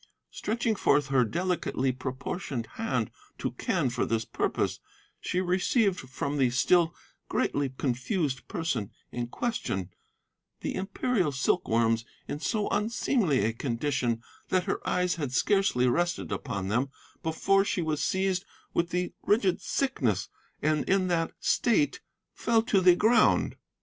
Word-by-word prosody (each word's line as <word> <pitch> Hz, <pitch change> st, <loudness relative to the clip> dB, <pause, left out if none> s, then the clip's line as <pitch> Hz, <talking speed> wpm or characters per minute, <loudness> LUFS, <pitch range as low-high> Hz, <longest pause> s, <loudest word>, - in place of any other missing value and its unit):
Stretching 225 Hz, +1 st, -1 dB
forth 145 Hz, -7 st, +2 dB
her 135 Hz, -2 st, +4 dB
delicately 165 Hz, -, 0 dB
proportioned 130 Hz, 0 st, -4 dB
hand 125 Hz, -, -1 dB, 0.3 s
to -, -, -2 dB
Quen -, -, 0 dB
for 120 Hz, -, 0 dB
this 115 Hz, -1 st, 0 dB
purpose, -, -, -1 dB, 0.4 s
she 180 Hz, -, -1 dB
received 185 Hz, +2 st, +2 dB
from 135 Hz, +2 st, -3 dB
the 130 Hz, -3 st, +4 dB
still 165 Hz, +7 st, +3 dB, 0.3 s
greatly 140 Hz, -1 st, 0 dB
confused 130 Hz, -, -1 dB
person 130 Hz, -, -2 dB, 0.2 s
in 120 Hz, -1 st, -3 dB
question 110 Hz, -, -2 dB, 0.7 s
the -, -, -2 dB
Imperial 195 Hz, -, 0 dB
silkworms 115 Hz, -4 st, +2 dB, 0.2 s
in 145 Hz, -, -4 dB
so 210 Hz, +5 st, 0 dB
unseemly 210 Hz, -, +1 dB
a 115 Hz, -, +1 dB
condition 120 Hz, -1 st, -1 dB, 0.3 s
that 185 Hz, -1 st, +2 dB
her 195 Hz, -, -2 dB
eyes 180 Hz, -1 st, +1 dB
had 145 Hz, -6 st, -2 dB
scarcely 195 Hz, -3 st, +3 dB
rested 175 Hz, +7 st, 0 dB
upon 100 Hz, -8 st, -3 dB
them 120 Hz, +7 st, +1 dB, 0.3 s
before 195 Hz, +5 st, +2 dB
she 185 Hz, -3 st, -1 dB
was 155 Hz, -2 st, -1 dB
seized 190 Hz, -1 st, +1 dB, 0.3 s
with 170 Hz, 0 st, +1 dB
the 180 Hz, +1 st, -1 dB
rigid 205 Hz, -4 st, +2 dB
sickness, 120 Hz, -, 0 dB, 0.3 s
and 155 Hz, 0 st, +2 dB
in 190 Hz, -1 st, +3 dB
that 165 Hz, -2 st, +1 dB
state 270 Hz, +5 st, +2 dB, 0.3 s
fell 225 Hz, -1 st, +2 dB
to 200 Hz, -4 st, +2 dB
the 180 Hz, -1 st, +7 dB
ground. 220 Hz, +3 st, +4 dB
160 Hz, 135 wpm, -28 LUFS, 125-195 Hz, 0.7 s, the